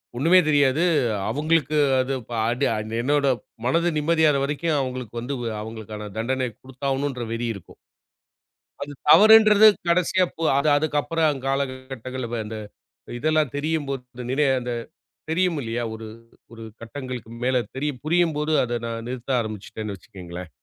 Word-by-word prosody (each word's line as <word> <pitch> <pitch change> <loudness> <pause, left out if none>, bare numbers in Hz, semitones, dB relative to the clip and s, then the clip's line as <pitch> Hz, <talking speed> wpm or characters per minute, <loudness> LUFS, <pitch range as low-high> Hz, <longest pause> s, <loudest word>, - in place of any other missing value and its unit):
ஒண்ணுமே 165 +8 +5
தெரியாது. 145 +1 +3 0.5
அவுங்களுக்கு 155 +3 +1 0.2
அது 130 +1 -2 0.2
ப - - -12 0.2
அடி 125 +4 0 0.4
என்னோட 145 +2 +2 0.4
மனது 170 +7 +2
நிம்மதியாற 155 -1 +3
வரைக்கும் 150 +2 0
அவுங்களுக்கு 125 -3 -5
வந்து 135 +4 -4 0.3
அவுங்களுக்கான 110 -1 -7
தண்டனைய 130 +1 -1
குடுத்தாவாணுன்ற 135 0 -3
வெறி 120 +1 -2
இருக்கும். 100 - -13 1.1
அது 145 +1 -5 0.2
தவறுன்றது 215 +3 +8 0.2
கடைசியா 180 +1 +3
போ 165 - -4
அது 145 +2 +2
அதுக்கப்புறம் 155 +1 0
அங் 135 -3 -4
காலங்கள், 135 -1 -1
கட்டங்கள் 130 0 -5
வ - - 0
அந்த 110 +1 -6 0.6
இதெல்லாம் 155 -2 +1
தெரியும் 155 0 -1
போது, 135 -2 -3 0.2
அந் 120 - -6
நினை 145 +3 +2
அந்த 125 0 -4 0.6
தெரியுமில்லையா, 150 -9 0
ஒரு 110 0 -8 0.4
ஒரு 115 -1 -10 0.2
கட்டங்களுக்கு 125 -2 -7
மேல, 125 -1 +2
தெரியு 145 +1 -1
புரியும்போது 155 -2 +1
அதை 120 -1 -2
நான் 115 0 -5
நிறுத்த 125 +1 -7
ஆரம்பிச்சுட்டேன்னு 110 -1 -6
வச்சுக்கங்களேன். 90 0 -10
135 Hz, 135 wpm, -24 LUFS, 120-155 Hz, 1.1 s, தவறுன்றது